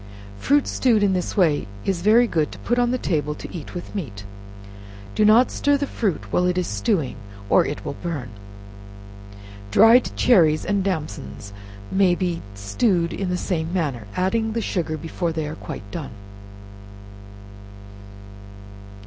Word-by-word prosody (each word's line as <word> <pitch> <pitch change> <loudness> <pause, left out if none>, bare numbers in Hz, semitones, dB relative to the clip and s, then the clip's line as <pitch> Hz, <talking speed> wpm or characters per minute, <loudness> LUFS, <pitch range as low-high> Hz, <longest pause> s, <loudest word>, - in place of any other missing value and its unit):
Fruit 285 0 +3
stewed 230 -5 +2
in 195 -2 +3
this 180 +3 -2
way 155 - +2 0.2
is 185 -3 -1
very 220 +5 +5
good 160 -9 0
to - - -9
put 240 +1 -1
on 245 0 +2
the 255 - 0
table 150 -9 -1
to - - -9
eat 165 0 -8
with 175 - -7
meat. 120 - -5 0.9
Do - - +2
not 220 +4 +5
stir 285 0 +2
the 285 - -1
fruit 160 - -3
while 180 - +3
it 180 0 0
is 180 - +1
stewing, 185 - -1 0.3
or - - +6
it - - -5
will - - -4
burn. 145 -10 -4 1.4
Dried 225 - +6
cherries 160 -10 +4
and 200 -1 0
damsons 150 - -4 0.4
may 190 -2 +3
be 175 -2 -2
stewed 170 - 0
in 195 -2 -3
the 180 - 0
same 165 -3 -2
manner, 140 - -2
adding 220 +4 0
the 230 - -1
sugar 165 -7 -2
before 165 +2 -3
they 160 -1 -3
are 150 - -5
quite 160 - -7
done. - - -6
180 Hz, 155 wpm, -22 LUFS, 155-215 Hz, 1.4 s, or